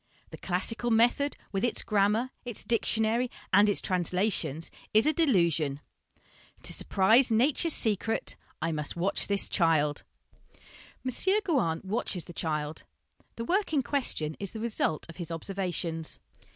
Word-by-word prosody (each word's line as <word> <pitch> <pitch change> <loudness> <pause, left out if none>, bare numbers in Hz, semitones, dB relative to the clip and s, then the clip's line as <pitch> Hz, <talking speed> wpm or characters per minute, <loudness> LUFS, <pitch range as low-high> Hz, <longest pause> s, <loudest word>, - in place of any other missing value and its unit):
The - - -8
classical 225 +6 -2
method, 240 +5 +2
with 195 -1 -2
its 245 - 0
grammar, 215 +4 +1
its 240 -4 -6
dictionary, 230 +2 +1 0.2
and 205 +2 +6
its 205 - +3
translations, 180 -3 -1 0.2
is 215 - +6
a 305 - +3
delusion." 170 - +2 0.4
" - - -29
To - - +2
surprise 225 +7 +3
Nature's 280 +8 +2
secret, 220 0 -1 0.3
I 165 - 0
must 150 -2 -3
watch 180 +3 0
this 200 -1 +3
child." 155 -5 +1 1.1
M. - - +1 0.3
Gouin 230 - 0
watches 190 -3 -2
the 175 - -11
child 155 -2 -3 0.5
the 230 - -5
work 380 - 0
in 280 -3 +2
question 235 - +1
is 200 -2 -5
the 220 - -6
result 215 -9 -1
of 165 - -11
his 175 -2 -5
observations. 170 -2 -3
200 Hz, 140 wpm, -29 LUFS, 165-235 Hz, 1.1 s, and